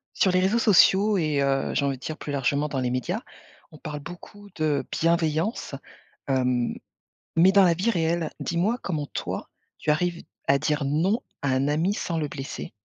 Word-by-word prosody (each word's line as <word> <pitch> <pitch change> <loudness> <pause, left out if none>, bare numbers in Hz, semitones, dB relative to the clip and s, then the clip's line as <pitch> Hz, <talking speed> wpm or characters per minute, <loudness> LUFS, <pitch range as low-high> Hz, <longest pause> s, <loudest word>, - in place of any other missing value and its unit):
Sur 190 - +3
les 185 - +3
réseaux 195 +5 +2
sociaux 205 -1 +5
et 155 -5 +1
heu, 135 0 0
j'ai 140 - +1
envie 140 -1 0
de 130 - -21
dire 155 - -5
plus 145 - -5
largement 140 +2 0
dans 140 -2 -2
les 125 -1 -1
médias, 175 - -2 0.5
on 155 - -13
parle 150 0 -6
beaucoup 180 +6 -11
de 150 -4 0
bienveillance, 165 - 0 0.5
hem, 125 -2 +1 0.6
mais 180 +4 +6
dans 200 0 +6
la 175 - +4
vie 185 +7 0
réelle, 170 -4 0
dis-moi 185 +8 0
comment 155 -6 -3
toi - - -5 0.3
tu - - -4
arrives 170 +3 0 0.2
à 140 - +5
dire 150 -1 0
non 175 - +1 0.2
à 140 - 0
un 130 +2 +1
ami 165 +7 +1
sans 170 -5 -3
le 150 -2 -1
blesser? 135 -1 -6
160 Hz, 185 wpm, -25 LUFS, 140-185 Hz, 0.6 s, mais